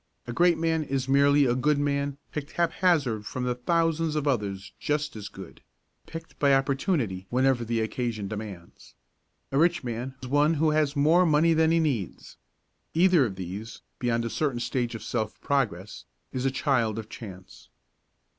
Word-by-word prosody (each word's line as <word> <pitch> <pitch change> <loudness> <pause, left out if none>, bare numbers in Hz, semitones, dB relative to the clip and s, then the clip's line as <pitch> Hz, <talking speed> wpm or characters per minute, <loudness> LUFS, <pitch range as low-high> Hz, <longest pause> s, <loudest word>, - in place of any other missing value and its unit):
A 120 - -5
great 175 +3 +4
man 160 0 +1
is 135 -3 -2
merely 140 +1 +4
a 120 - +2
good 140 +4 +2
man 140 -1 -1
picked 150 -1 -6
haphazard 160 - +1
from 125 -1 -2
thousands 165 +4 0
of 150 -1 -1
others 100 -7 -1
just 150 -2 -1
as 105 -2 -7
good - - -11 0.5
picked 165 0 -9
by 140 -1 +5
Opportunity 135 - 0
whenever 130 0 +2
the 115 0 -1
occasion 110 -2 -2
demands. 100 -5 -9 0.6
A 135 - +2
rich 170 -1 +3
man 125 +2 -4
is - - -5
one 145 +4 +3
who 155 +1 +2
has 150 -1 +1
more 155 +5 +4
money 165 0 +4
than 160 0 +3
he 165 0 +3
needs. 130 - -2 0.6
Either 170 -5 +5
of 95 - -7
these, 95 +5 -7 0.2
beyond 115 -1 0
a 115 - -3
certain 140 -6 -1
stage 120 0 -2
of 110 - -7
self 110 -2 -3
progress, 105 -9 -2 0.3
is 130 0 -2
a - - +4
child 130 -5 0
of 110 -1 -5
chance. 95 -5 -11
135 Hz, 165 wpm, -27 LUFS, 115-150 Hz, 0.6 s, by